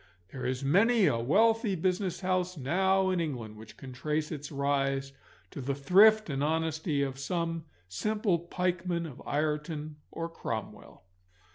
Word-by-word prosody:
There 130 - -4
is 130 +1 -2
many 205 - +4
a 135 -8 +2
wealthy 215 - +3
business 185 +2 -1
house 185 -1 0
now 190 +7 +2
in 185 - 0
England 125 -10 -4
which 110 0 -13
can 130 -1 -9
trace 150 +5 -2
its 145 -1 -6
rise 135 -1 0 0.4
to - - -6
the 135 +2 -2
thrift 210 +9 +5
and 140 -2 -2
honesty 160 -1 0
of 135 -1 -4
some 165 +2 -2 0.2
simple 210 - 0
pikeman 175 0 -2
of 145 -6 -9
Ireton 150 0 -2
or 165 - -4
Cromwell. 165 - -6
160 Hz, 145 wpm, -30 LUFS, 140-185 Hz, 0.4 s, thrift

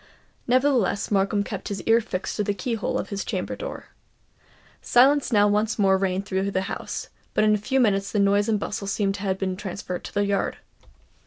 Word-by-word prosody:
Nevertheless 250 -6 +2
Markham 200 +1 +2
kept 200 -2 -6
his 200 -1 -4
ear 225 +1 +4
fixed 195 -4 -4
to 210 - +1
the 205 0 -1
key 230 +6 -3
hole 225 - -1
of - - -4
his 200 -1 -3
chamber - - -3
door. - - -7 0.9
Silence 270 +3 +4
now 205 -2 +5
once 210 +2 +1
more 195 -2 +4
reigned 190 0 -1
throughout 195 0 -1
the 190 - +1
house; 195 - -5 0.3
but - - +3
in 215 0 +4
a - - +3
few 265 +6 0
minutes 200 -4 +2
the - - -1
noise 200 +1 +3
and 215 -2 +2
bustle 200 0 -4
seemed 195 0 0
to 195 - -7
have 190 -2 -1
been 190 -1 -2
transferred 185 -1 -5
to - - -8
the 205 0 +2
yard. 200 -1 -1
205 Hz, 210 wpm, -24 LUFS, 195-220 Hz, 0.9 s, now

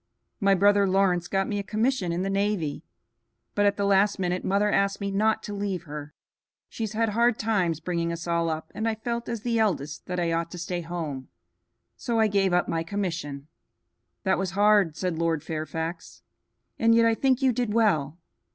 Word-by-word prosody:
"My 200 -2 +4
brother 200 +1 +4
Lawrence 185 -2 +2
got 195 +1 0
me 205 -1 -2
a - - -3
commission 215 -2 0
in 175 +2 -1
the 195 - -1
navy, 195 -7 -1 0.7
but 205 0 +3
at 200 - +1
the 200 - 0
last 200 +1 +3
minute 180 -1 -1
mother 205 +2 +2
asked 200 0 +1
me 200 0 -2
not 220 +2 +1
to 205 - -6
leave 200 -3 -3
her. 150 -2 -8 0.5
She - - -9
has 220 -1 -2
had 225 +1 +1
hard 235 +2 +2
times 190 -8 0
bringing 170 0 -2
us 170 0 -5
all 170 -1 0
up, 160 0 -4
and 225 +1 -1
I 220 - -1
felt, 235 +1 -4
as 230 -2 -3
the 230 0 0
eldest, 155 -9 -1
that 180 0 -2
I 170 -1 0
ought 165 0 -1
to - - -6
stay 175 +1 -3
at 170 - -8
home; 155 -6 -5 0.7
so 235 -2 -1
I 220 - +5
gave 200 -2 +2
up 175 0 +2
my 165 -1 -1
commission." 165 -6 -4 0.8
"That 190 -2 +1
was 190 -2 -2
hard," 205 -6 +4
said 180 -3 -2
Lord 165 -3 0
Fairfax, 160 +1 -5 0.6
"and 230 0 +4
yet 230 0 +5
I 230 - +4
think 260 +2 +1
you 260 - +5
did 240 -2 -1
well. 170 -10 +2
195 Hz, 205 wpm, -26 LUFS, 170-210 Hz, 0.8 s, I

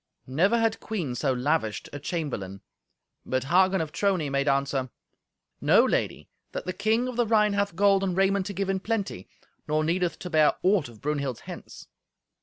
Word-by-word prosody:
Never 180 - +2
had 225 -1 +1
queen 180 - -3
so 135 +2 0
lavished 125 -3 -1
a 145 - -5
chamberlain. 130 - -4 0.6
But 130 -1 -1
Hagen 185 +5 +3
of 155 -2 -4
Trony 180 -6 0
made 140 +1 0
answer, 140 -1 +1 0.7
"Know, - - +5
Lady, - - -1 0.3
that - - -4
the 185 - -3
King 220 +6 +1
of 250 -2 -5
the 240 -2 +2
Rhine 210 -2 +3
hath 200 -3 0
gold 195 0 +4
and 185 -2 -1
raiment 195 0 +2
to 200 - -5
give 195 +1 -2
in 190 - -1
plenty, 200 - -3 0.4
nor 155 +1 +1
needeth 175 +2 0
to 180 - -7
bear 155 -2 +5
aught 185 -7 +2
of 115 -2 -16
Brunhild's 140 -4 -2
hence." - - -10
175 Hz, 180 wpm, -26 LUFS, 140-200 Hz, 0.7 s, Know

